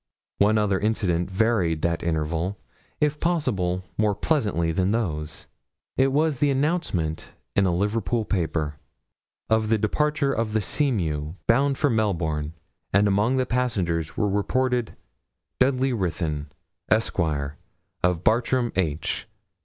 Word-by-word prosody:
One 105 +2 +4
other 100 -3 +2
incident 95 -6 0
varied 95 -6 +1
that 85 -1 +1
interval, 85 +4 -1 0.4
if 150 0 +1
possible 100 - 0 0.2
more 105 -2 +3
pleasantly 100 - 0
than 90 +3 +1
those. 80 -9 -2 0.5
It 135 0 +3
was 150 -1 +1
the 145 - +3
announcement, 135 - -1 0.2
in 100 -1 +4
a - - +2
Liverpool 110 +3 0
paper, 80 -6 -1 0.7
of 110 -1 +2
the 110 - +4
departure 140 +6 +1
of 110 -1 -1
the 110 - +3
Seamew, 85 - -1
bound 135 +4 +3
for 145 - +2
Melbourne; 80 -9 0 0.4
and 100 +2 +4
among 105 +6 +2
the 130 - +2
passengers 95 -11 -1
were 105 - +2
reported 120 +4 0 0.6
'Dudley 130 0 +2
Ruthyn, 80 -7 -2 0.4
Esquire, 75 -10 0 0.4
of 90 -1 +1
Bartram 120 +2 +2
H. 80 -4 -1
105 Hz, 125 wpm, -25 LUFS, 85-125 Hz, 0.7 s, One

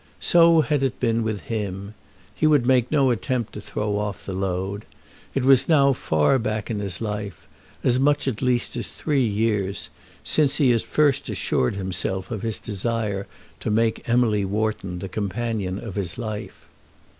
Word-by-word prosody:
So 165 -1 +6
had 145 0 0
it 135 -2 -1
been 115 -2 +1
with 110 -2 -2
him. 100 -2 -4 0.4
He 155 - +1
would 145 -5 +4
make 125 -2 +3
no 140 -4 +3
attempt 120 0 -2
to 105 - -7
throw 105 0 -2
off 105 -1 -4
the 95 - -4
load. 95 +2 -3 0.5
It 135 - +1
was 135 +2 +5
now 140 -4 +5
far 80 - +2
back 110 -2 -2
in 105 - -2
his 100 -4 -4
life, 105 -4 -5 0.4
as 125 0 +3
much 145 +1 +2
at 120 -5 -2
least 125 -2 +1
as 120 - -3
three 145 -4 0
years, 105 -3 -1 0.3
since 145 -2 +3
he 135 -5 +4
had 115 -2 +2
first 145 -3 +1
assured 85 - 0
himself 95 0 -2
of 110 -4 -3
his 115 -1 -2
desire 105 -1 -2 0.3
to - - -3
make 110 +2 0
Emily 115 -4 +3
Wharton 100 -2 -2
the 95 +2 -5
companion 105 -1 -3
of 105 -1 -7
his 95 -2 -3
life. 110 -3 -6
110 Hz, 170 wpm, -23 LUFS, 100-125 Hz, 0.5 s, So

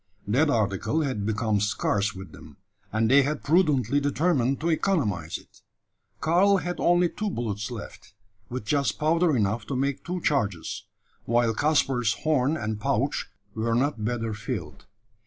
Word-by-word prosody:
That 140 +9 +3
article 110 - 0
had 130 -9 -2
become 110 -1 0
scarce 105 0 0
with 95 -3 -9
them; 75 -3 -14 0.3
and 110 +1 +1
they 135 +4 +6
had 145 +2 -2
prudently 145 - +3
determined 145 -2 +1
to 165 - 0
economise 110 - 0
it. - - -20 0.6
Karl 180 +7 +4
had 175 -1 -4
only 175 0 +4
two 215 +4 -3
bullets 110 - -3
left, 105 -3 -9 0.3
with 125 -3 -5
just 140 +2 0
powder 160 +1 +2
enough 105 +1 -1
to 140 - -3
make 135 +1 -1
two 180 +1 -3
charges; 100 - -1 0.4
while 120 0 +2
Caspar's 130 -5 +2
horn 150 -1 +2
and 110 -5 -4
pouch - - 0 0.2
were 115 +1 0
not 125 -3 0
better 115 -1 -2
filled. 105 0 -6
125 Hz, 150 wpm, -26 LUFS, 110-155 Hz, 0.6 s, they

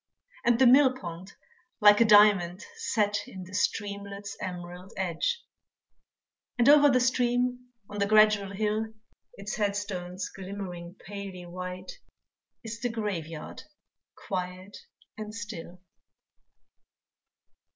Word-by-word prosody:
And 240 -1 +4
the 260 - +5
mill 260 +1 +6
pond 180 -1 -8 0.5
like 210 0 +7
a - - +7
diamond 205 -3 +5
set 210 - 0
In 190 -1 -9
the 185 +2 -13
streamlet's 200 0 -3
emerald 180 0 -7
edge; 190 - -1 1.1
And 240 - +3
over 290 0 +8
the 255 -2 +4
stream 250 0 +1 0.2
on 205 - -7
the 200 - +2
gradual 215 -2 +5
hill, 215 +2 -1 0.4
Its 200 +1 -6
headstones 200 -3 -2
glimmering 185 -2 -7
palely 195 -3 -7
white, 180 - -7 0.6
Is 225 0 -6
the 245 - -1
graveyard 180 -9 -5 0.5
quiet 185 +1 -5 0.4
and 215 0 -6
still. 185 -5 -8
205 Hz, 110 wpm, -28 LUFS, 185-225 Hz, 1.1 s, over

